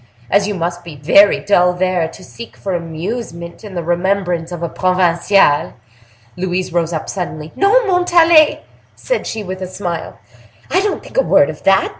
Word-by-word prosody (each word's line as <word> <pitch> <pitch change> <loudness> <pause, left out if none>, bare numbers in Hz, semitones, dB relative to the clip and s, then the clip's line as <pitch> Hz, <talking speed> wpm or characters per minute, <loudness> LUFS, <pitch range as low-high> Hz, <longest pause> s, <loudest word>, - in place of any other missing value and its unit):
As 200 0 +3
you 210 - -3
must 175 0 -3
be 170 -3 -10
very 190 +8 +4
dull 180 -3 +3
there, 180 -2 0
to 160 - -13
seek 235 - -12
for 195 - -4
amusement 170 +2 -6
in 205 -3 -9
the 175 - -3
remembrance 175 0 -1
of 175 -1 -6
a - - 0
provinciale—'" 180 -2 +2 0.6
Louise 180 -1 -3
rose 170 -1 0
up 160 -2 -4
suddenly. 160 -5 -5
"No, 440 +5 +3
Montalais," 345 -4 +4 0.3
said - - -3
she, 220 -1 -4
with 190 0 -7
a 185 - -4
smile; 180 -3 -5 0.5
"I 375 - +3
don't 410 0 -2
think - - -11
a - - +6
word - - +3
of - - -13
that. 195 0 +3
185 Hz, 175 wpm, -16 LUFS, 170-205 Hz, 0.6 s, a